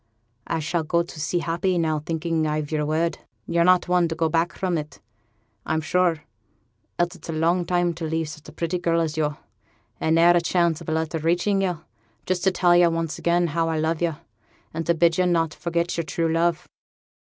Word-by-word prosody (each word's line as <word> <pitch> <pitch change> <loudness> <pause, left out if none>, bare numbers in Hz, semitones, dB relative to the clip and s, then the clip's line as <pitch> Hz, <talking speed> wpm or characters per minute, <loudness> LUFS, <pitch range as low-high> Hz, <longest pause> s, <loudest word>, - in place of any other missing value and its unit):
I 165 - -1
shall 165 +2 -1
go 170 +2 +1
to 170 -2 -11
sea 170 +3 -1
happy, 175 +2 0
now, 160 -2 +1
thinking 160 0 -1
I've 150 0 -2
yo'r 150 -1 0
word. 165 +2 0 0.3
Yo're 170 0 +2
not 180 +1 +4
one 180 -1 +3
to 165 - -4
go 165 0 +1
back 165 +2 +1
from 185 -2 -1
it, 150 -1 -5 0.6
I'm 160 0 0
sure, 165 -1 +1 0.7
else 175 +1 +1
it's 170 -2 -13
a - - -2
long 170 +3 +1
time 175 -1 +1
to 165 0 -5
leave 160 0 -1
such 155 -1 -10
a - - -11
pretty 170 +1 -2
girl 170 -1 +1
as 160 -2 -1
yo', 150 -2 -1 0.6
and 160 0 +2
ne'er 170 +1 +6
a 175 - +3
chance 170 -1 +1
of 165 - -7
a - - -1
letter 160 0 -1
reaching 175 +5 +1
yo' 180 -4 -1 0.4
just 185 -1 -1
to 190 - +4
tell 175 -1 +3
yo' 175 -1 +6
once 165 -1 -2
again 175 +1 +2
how 165 0 +1
I 160 - -1
love 160 +1 -1
yo', 170 -3 0 0.6
and 165 0 -4
to 170 - +3
bid 170 +1 +3
yo' 180 - +3
not 165 -3 +1
forget 170 0 -2
yo'r 170 - -1
true 165 0 -1
love.' 170 +1 +1
165 Hz, 215 wpm, -24 LUFS, 160-175 Hz, 0.7 s, ne'er